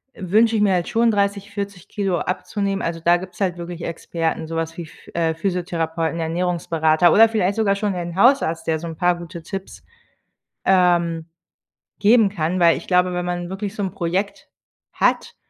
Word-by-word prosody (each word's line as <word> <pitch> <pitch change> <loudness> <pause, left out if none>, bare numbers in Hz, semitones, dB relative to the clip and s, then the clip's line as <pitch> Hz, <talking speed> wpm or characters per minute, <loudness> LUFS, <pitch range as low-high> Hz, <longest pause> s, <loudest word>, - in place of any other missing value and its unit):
wünsche 220 +5 +2
ich 210 - +2
mir 195 -2 +3
halt 175 -1 0
schon 230 0 +3
30, 200 0 -1
40 200 -3 -6
Kilogramm 195 -4 -2
abzunehmen“, 195 +1 -2
also, 165 0 -3
da 170 +2 +4
gibt's 185 +1 -10
halt 180 -3 0
wirklich 170 0 -7
Experten, 165 -1 -3
sowas 165 0 -3
wie 170 - -6
Ph - - -17
äh, 165 -1 0
Physiotherapeuten, 165 -2 -2
Ernährungsberater 165 -1 +1
oder 225 +1 +7
vielleicht 200 -3 0
sogar 200 -3 +2
schon 200 -1 -1
den 175 -1 -5
Hausarzt, 195 -7 +3
der 160 -1 0
so 170 - -6
’n 165 - -6
paar 175 +2 +2
gute 170 -1 -9
Tipps, 195 +2 -7 0.8
ähm, 175 -3 +2 0.7
geben 215 +1 +5
kann, 180 -1 -2
weil 170 -1 +5
ich - - -10
glaube, 180 0 +3
wenn 180 0 -2
man 175 0 -3
wirklich 200 +2 -5
so 205 - -3
’n 190 - -2
Projekt 185 +5 -3 0.4
hat, - - 0
180 Hz, 180 wpm, -21 LUFS, 165-200 Hz, 0.8 s, oder